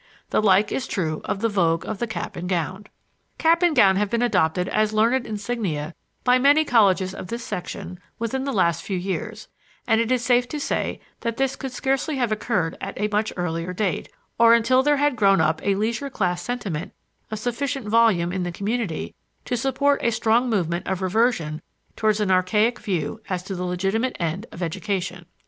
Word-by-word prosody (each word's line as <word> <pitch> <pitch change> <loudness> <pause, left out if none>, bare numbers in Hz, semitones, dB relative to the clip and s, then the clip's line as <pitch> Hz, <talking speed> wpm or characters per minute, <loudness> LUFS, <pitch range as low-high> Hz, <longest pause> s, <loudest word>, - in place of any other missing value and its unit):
The - - +3
like 205 0 +4
is 260 - -2
true 155 -5 -2
of 195 - -2
the 230 - +3
vogue 170 -6 +1
of 215 -2 -4
the 240 - -1
cap 220 - -5
and 180 +1 -5
gown. 185 +3 -2 0.5
Cap 335 +1 +3
and 345 -3 +3
gown 195 -6 +5
have 205 0 +1
been 235 +2 0
adopted 180 -6 +1
as 215 0 +1
learned 235 +3 +2
insignia 205 -8 -3 0.3
by 250 0 +4
many 290 +4 +5
colleges 195 - +3
of 185 - -7
this 235 +3 -5
section 180 -2 -6 0.2
within 235 +4 -2
the 275 - -2
last 170 - +2
few 195 - -3
years; 195 +4 -4 0.4
and 225 0 +3
it 230 +1 -1
is 250 -2 +1
safe 245 0 +3
to 300 - -4
say - - -2 0.2
that 230 -1 -3
this 270 0 0
could 265 - -6
scarcely 270 +4 -1
have 245 -4 0
occurred 205 -6 -1
at 195 - -5
a 210 +1 0
much 210 +1 0
earlier 175 0 -2
date, 185 -3 -2 0.3
or 230 0 +7
until 245 +3 +3
there 295 +1 +3
had 290 -1 +2
grown 195 -4 +4
up 160 0 +1
a 200 -1 +2
leisure 225 +7 -1
class 180 -8 -1
sentiment 195 -6 -4 0.4
of 215 - -4
sufficient 245 +2 -3
volume 210 -6 +3
in 190 - -2
the 175 0 -2
community 205 -1 -3 0.3
to - - -1
support 280 +3 +1
a - - +3
strong 230 +2 +2
movement 175 -5 -1
of 190 0 -2
reversion 185 -6 +1 0.3
towards 215 -1 +1
an 205 -3 +1
archaic 210 +6 +2
view 180 +1 -3
as 180 -2 -2
to 195 - -5
the 180 -1 -4
legitimate 195 +8 -1
end 175 +6 -2
of 175 - -6
education. 180 0 -3
210 Hz, 195 wpm, -23 LUFS, 180-240 Hz, 0.5 s, or